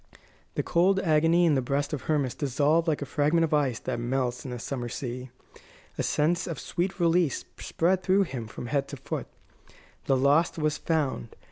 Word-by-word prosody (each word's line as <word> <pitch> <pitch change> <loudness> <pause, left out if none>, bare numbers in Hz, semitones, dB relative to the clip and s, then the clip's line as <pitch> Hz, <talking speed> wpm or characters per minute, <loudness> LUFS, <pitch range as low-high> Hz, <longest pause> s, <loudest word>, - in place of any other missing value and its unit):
The - - 0
cold 185 +3 +3
agony 165 +1 +3
in 160 - +4
the 135 - +2
breast 140 +4 -1
of 150 - -2
Hermas 145 -5 0
dissolved 150 +4 +1
like 150 -3 0
a - - -5
fragment 150 +4 +2
of 160 - 0
ice 140 -6 +2
that - - -3
melts 125 0 -1
in 135 - -6
the 125 - -4
summer 120 0 -4
sea. 125 +1 -5 0.7
A - - -2
sense 170 +3 +1
of 170 - -4
sweet 185 +3 -3
release 170 -3 +2
spread 185 +3 +1
through 190 +1 +3
him 125 - -5
from 110 - -8
head 140 +2 -1
to 140 - -7
foot. - - -5 0.8
The 135 - +3
lost 145 +7 +3
was 155 -1 0
found. 145 - -1
150 Hz, 190 wpm, -27 LUFS, 130-165 Hz, 0.8 s, in